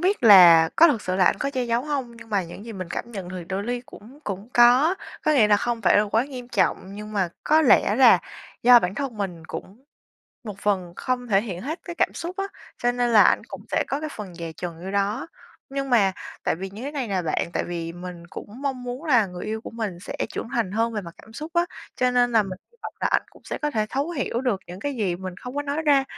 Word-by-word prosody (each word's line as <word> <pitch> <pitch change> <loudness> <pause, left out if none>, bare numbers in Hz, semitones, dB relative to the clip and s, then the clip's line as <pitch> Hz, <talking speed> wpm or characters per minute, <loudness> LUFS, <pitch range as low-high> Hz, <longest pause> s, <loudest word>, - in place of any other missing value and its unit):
biết 370 -3 +1
là 175 -6 +9
có 335 - +8
thật 235 -9 0
sự 185 - -2
là 185 - +4
anh - - +3
có 280 - -1
che 260 -3 -1
giấu 235 0 0
hông, 265 -6 -3
nhưng 230 -1 -13
mà 200 -2 +1
những 175 +4 -10
gì 230 - -7
mình 185 -3 -6
cảm 235 +5 -5
nhận 190 -4 -6
được 180 -1 -6
đôi 195 +1 -2
li 245 +1 -2
cũng 245 +8 -14
cũng 200 +3 -5
có. 250 +8 +6 0.3
Có 310 - +4
nghĩa 230 -8 +5
là 205 - +6
không 235 +1 -2
phải 185 - +5
là - - +5
quá 225 +4 +1
nghiêm 250 -3 -8
trọng, 195 -2 0
nhưng 210 +1 -8
mà 190 -4 +1 0.2
có 315 +1 +4
lẽ 220 -5 +5
là 255 -3 +7 0.4
do 245 0 +9
bản 180 -2 -2
thân 270 -4 -4
mình 180 -5 -4
cũng 225 +8 -9 0.6
một 210 -3 -7
phần 190 -4 -1
không 250 -1 -2
thể 195 -2 +4
hiện 185 -6 -5
hết 310 +7 -4
cái 345 - -6
cảm - - +1
xúc 355 +3 -6
á, 390 - -1 0.3
cho 245 0 +1
nên 245 -1 0
là 215 -2 +7
ảnh - - +4
cũng - - -8
sẽ - - +1
có 275 - -2
cái 310 - -4
phần 195 -5 -7
dè 165 -1 -6
chừng 170 +1 -7
vô 190 - -4
đó. 200 +4 -1 0.4
Nhưng 275 -1 -3
mà 200 -6 +4 0.3
tại - - +1
vì 190 +2 -6
như 210 +4 -9
thế 280 - -4
này 275 -6 -3
nè 190 -3 0
bạn, 165 +1 -1
tại - - -1
vì 170 -1 -4
mình 175 -1 -9
cũng - - -9 0.2
mong 265 -3 -2
muốn 250 +5 -6
là 245 -9 +4
người 180 -1 -8
yêu 220 +1 -3
của - - -8
mình 215 -6 -4
sẽ - - -7
trưởng - - -5
thành 225 -6 -1
hơn 230 +1 0
về 210 - -2
mặt 170 -3 -10
cảm 220 - -16
xúc 305 +7 -7
á, 345 - +4 0.3
cho 250 0 +2
nên 245 -1 +2
là 225 -2 +5
mình 185 -2 -7
hy - - -27
vọng - - -6
là - - +2
ảnh - - +2
cũng - - -20
sẽ - - -4
có 300 - -1
thể 215 -5 0
thấu 280 +5 -1
hiểu 255 -6 -2
được 245 -7 0
những 180 +2 -9
cái 285 -1 -3
gì 185 -6 0
mình 185 -1 -7
không 250 +1 -8
có 290 - 0
nói 290 +2 -2
ra. 280 -3 +4
225 Hz, 270 wpm, -24 LUFS, 190-260 Hz, 0.6 s, là